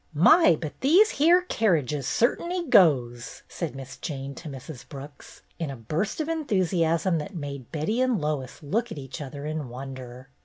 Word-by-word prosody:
"My, 175 - +6
but 155 -2 -7
these 355 - +5
here 345 +5 +4
kerriges 155 - 0
cert'n'y 340 +8 0
goes 125 -10 +3
!" - - -40
said 165 -5 -5
Miss 135 -1 -9
Jane 140 -3 -5
to 155 +3 -9
Mrs. 135 0 -9
Brooks, 140 +1 -11 0.2
in 165 -3 -2
a 135 - -5
burst 155 - -3
of 310 - -1
enthusiasm 185 - +1
that 195 +6 -7
made 140 -5 -6
Betty 170 +10 -1
and 255 -5 +2
Lois 150 -3 -3
look 225 +10 -1
at - - -6
each 135 +1 -7
other 140 +1 -7
in 155 -3 -4
wonder. 130 0 -9
155 Hz, 170 wpm, -26 LUFS, 135-215 Hz, 0.2 s, My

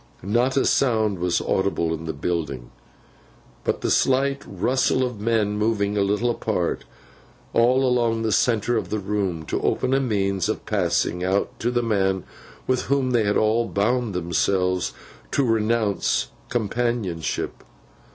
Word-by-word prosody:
Not 120 +7 +1
a - - +3
sound 110 -7 +2
was 90 0 +1
audible 90 -4 0
in 80 0 -5
the 80 - -2
building, 75 -8 -3 0.9
but - - -1
the - - 0
slight 135 +1 +2
rustle 130 +7 +1
of 125 -5 -3
men 105 -2 +1
moving 105 -2 +1
a 100 - +2
little 105 +5 +1
apart, 100 -7 -2 0.7
all 125 +3 +4
along 120 -3 +1
the 110 - 0
centre 115 +2 +2
of - - -3
the 110 - -1
room, 95 -5 -2
to - - -2
open 130 - 0
a 135 - +4
means 100 -6 0
of 110 - -3
passing 90 -3 0
out, 95 +2 +1
to 120 - 0
the 120 -1 0
man 95 -5 +1 0.4
with 130 -1 0
whom 135 -2 +1
they 115 -3 +2
had 100 - +2
all 110 +2 +2
bound 110 +1 0
themselves 90 +1 0 0.4
to 140 - +2
renounce 110 - +1 0.2
companionship. 115 -7 -2
105 Hz, 150 wpm, -23 LUFS, 95-120 Hz, 0.9 s, all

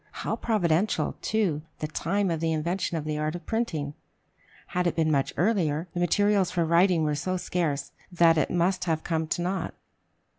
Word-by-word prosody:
How - - 0
providential, 195 -3 +1
too, 195 -9 0 0.2
the - - -3
time 195 +4 0
of 165 - -1
the 165 0 0
invention 170 +2 -1
of 155 - -4
the 150 -1 -2
art 155 +2 -1
of 175 -2 -8
printing! 160 -11 -2 0.8
Had 180 0 0
it - - 0
been 160 -1 +2
much 140 -2 +1
earlier, 170 -3 +1
the 175 - -3
materials 200 +2 +3
for 175 -2 0
writing 170 0 +4
were 150 -1 +1
so 185 +6 -1
scarce 165 -5 -2 0.2
that 170 -2 +5
it 155 - +1
must 180 +2 +1
have 160 -2 0
come 160 -2 -1
to 175 +2 -1
naught. 185 -1 -2
170 Hz, 185 wpm, -27 LUFS, 155-185 Hz, 0.8 s, that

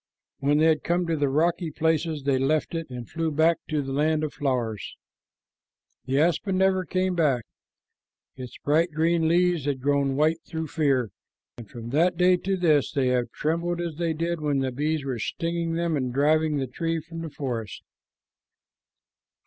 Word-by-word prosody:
When 145 +2 +2
they 155 - +4
had 160 -1 +3
come 175 +1 +1
to 165 -1 0
the 145 -2 +1
rocky 170 +4 +1
places, 160 -1 0
they 135 -1 +1
left 150 +5 0
it 165 -3 -4
and 125 -3 -7
flew 165 -1 -2
back 160 +2 +3
to 150 -2 0
the 135 - -5
land 155 +2 +1
of 155 - -3
flowers. 120 -7 -2 1.1
The 135 +2 +1
aspen 175 +4 +1
never 190 -1 +2
came 185 +1 0
back. 140 - +1 0.9
Its 125 -2 -9
bright 160 +4 +3
green 165 +1 +2
leaves 175 -2 +2
had 140 -2 -1
grown 140 0 +1
white 155 +3 +2
through 160 -2 -4
fear, 135 - +1 0.5
and 110 -4 -10
from 115 +1 -8
that 170 +5 +2
day 180 +1 +5
to 190 +2 -2
this 155 -6 +2
they 135 -4 +1
have 125 -1 0
trembled 170 +3 -2
as 170 -3 -4
they 165 -1 0
did 165 +1 -2
when 145 -2 0
the 135 -1 0
bees 150 +2 -1
were 130 -4 -3
stinging 165 +7 -2
them 170 -1 0
and 130 -3 -1
driving 150 +3 +2
the 135 - -1
tree 165 +6 -2
from 165 +1 -8
the 165 - -5
forest. 120 -7 -5
155 Hz, 180 wpm, -25 LUFS, 135-170 Hz, 1.1 s, day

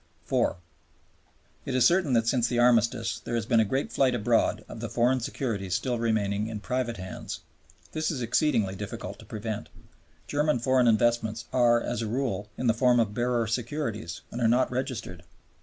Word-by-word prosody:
(iv.) - - +1 1.1
It 130 - -3
is 125 -2 +4
certain 170 -3 +3
that 115 -1 +2
since 120 0 +2
the 120 - -1
Armistice 120 -1 +3
there 120 - -4
has 115 -2 -1
been 115 0 +3
a - - +5
great 130 +7 -2
flight 130 -2 +2
abroad 115 0 +1
of - - -9
the - - -4
foreign 125 +2 +2
securities 105 -7 -2
still 125 +1 -1
remaining 105 -2 0
in 110 -2 -5
private 125 0 -2
hands. 95 -1 -7 0.5
This 155 0 -1
is 150 - -2
exceedingly 115 -4 +1
difficult 100 +1 -6
to - - -12
prevent. 105 -7 -5 0.6
German 150 -1 +1
foreign 125 +1 +3
investments 115 0 +2
are 120 -2 +4
as 120 -1 -3
a 115 - -2
rule 115 -3 -2
in - - -3
the 115 - +4
form 125 +1 +3
of 110 -3 +1
bearer 120 0 +1
securities 115 - -3
and 120 - -5
are 115 - +4
not 125 +3 +3
registered. 125 -8 -4
120 Hz, 180 wpm, -27 LUFS, 110-125 Hz, 1.1 s, a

